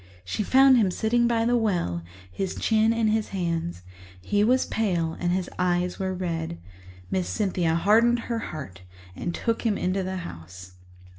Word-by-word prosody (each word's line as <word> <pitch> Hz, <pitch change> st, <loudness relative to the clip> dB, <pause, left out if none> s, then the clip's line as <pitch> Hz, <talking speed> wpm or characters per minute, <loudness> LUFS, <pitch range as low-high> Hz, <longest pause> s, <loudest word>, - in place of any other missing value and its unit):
She 95 Hz, -, -2 dB
found 265 Hz, +4 st, +6 dB
him 210 Hz, -5 st, +3 dB
sitting 235 Hz, +5 st, +1 dB
by 230 Hz, -1 st, +1 dB
the 240 Hz, +1 st, +2 dB
well, 175 Hz, -, 0 dB, 0.3 s
his 185 Hz, -, -3 dB
chin 220 Hz, 0 st, +2 dB
in 230 Hz, -1 st, +1 dB
his 215 Hz, 0 st, 0 dB
hands; 170 Hz, -, -3 dB, 0.4 s
he 205 Hz, -, +1 dB
was 255 Hz, +4 st, +3 dB
pale 175 Hz, -7 st, -1 dB
and 175 Hz, 0 st, 0 dB
his 180 Hz, 0 st, -1 dB
eyes 180 Hz, 0 st, 0 dB
were 190 Hz, -1 st, -1 dB
red. 165 Hz, -, -3 dB, 0.5 s
Miss 185 Hz, -2 st, -1 dB
Cynthia 180 Hz, -6 st, 0 dB
hardened 230 Hz, +7 st, +4 dB
her 230 Hz, -1 st, -3 dB
heart 135 Hz, -, -8 dB, 0.3 s
and 175 Hz, -, -3 dB
took 230 Hz, -1 st, -1 dB
him 220 Hz, -4 st, 0 dB
into 185 Hz, +2 st, 0 dB
the 190 Hz, 0 st, -3 dB
house. 90 Hz, -, -10 dB
190 Hz, 165 wpm, -25 LUFS, 170-225 Hz, 0.5 s, found